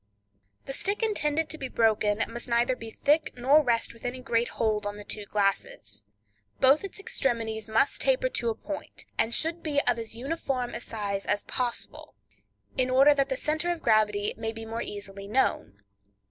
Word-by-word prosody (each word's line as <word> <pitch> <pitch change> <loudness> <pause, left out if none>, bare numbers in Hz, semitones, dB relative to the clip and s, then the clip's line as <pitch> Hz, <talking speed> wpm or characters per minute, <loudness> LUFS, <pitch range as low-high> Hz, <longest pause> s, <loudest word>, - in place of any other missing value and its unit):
—The 270 - -4
stick 400 - 0
intended 320 -8 +1
to 315 - -4
be 265 - -3
broken 220 -2 +2
must 235 +2 -7
neither 240 +2 +2
be 230 -2 -8
thick 300 +7 +2
nor 275 +5 +5
rest 235 -5 +1
with 230 - -17
any 245 +1 -3
great 240 -2 +1
hold 215 -2 0
on 205 0 -5
the 205 - -8
two 210 0 -4
glasses. 110 - -1 0.5
Both 270 +6 +5
its 395 0 -6
extremities 225 - -1
must 225 +6 +2
taper - - +3
to 235 - -1
a 225 - -1
point, 300 +5 -7
and 225 - +2
should 325 +6 0
be 295 -2 +1
of 235 - +1
as 225 0 -6
uniform 260 -1 -2
a - - -4
size 200 -3 -3
as 205 0 +1
possible, 245 -2 -3 0.6
in 255 0 +2
order 270 +3 +7
that 275 -1 +1
the 265 - 0
center 310 +3 -1
of 345 - -4
gravity 210 -2 +3
may 225 - -2
be 225 0 -8
more 225 +1 -4
easily 200 -2 -7
known. 150 - 0
235 Hz, 185 wpm, -28 LUFS, 215-285 Hz, 0.6 s, order